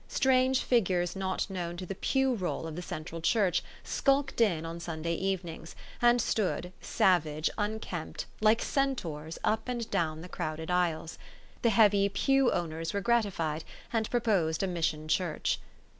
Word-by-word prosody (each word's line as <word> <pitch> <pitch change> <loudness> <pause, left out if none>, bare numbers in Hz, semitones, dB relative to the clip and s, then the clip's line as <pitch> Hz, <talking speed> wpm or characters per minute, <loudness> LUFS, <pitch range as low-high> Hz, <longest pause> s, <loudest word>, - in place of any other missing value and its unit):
Strange 260 0 +3
figures 185 -7 +1
not 190 -1 -1
known 175 -3 -4
to 185 - -5
the 195 - -4
pew 265 +6 +1
roll 185 -6 -2
of 160 -1 -5
the 175 - -4
Central 165 -1 -6
Church 185 -1 +2 0.2
skulked 275 -2 +1
in 170 -8 +2
on 165 +1 -5
Sunday 170 0 -3
evenings, 175 -3 -3 0.3
and 240 0 +5
stood, 190 -5 -1
savage, 155 -4 +2
unkempt, 205 -6 -3
like 215 +1 +4
Centaurs, 165 - -2
up 220 +3 0
and 240 -2 -2
down 160 -2 0
the 180 - -8
crowded 160 -1 -4
aisles. 170 -3 0 0.4
The 235 - +4
heavy 205 -2 +5
pew 270 +6 +3
owners 165 0 -2
were 200 - 0
gratified, 190 -9 0 0.3
and 220 -2 0
proposed 200 -9 +1
a - - +1
mission 160 -3 -1
church. 155 0 0
185 Hz, 150 wpm, -30 LUFS, 165-225 Hz, 0.4 s, and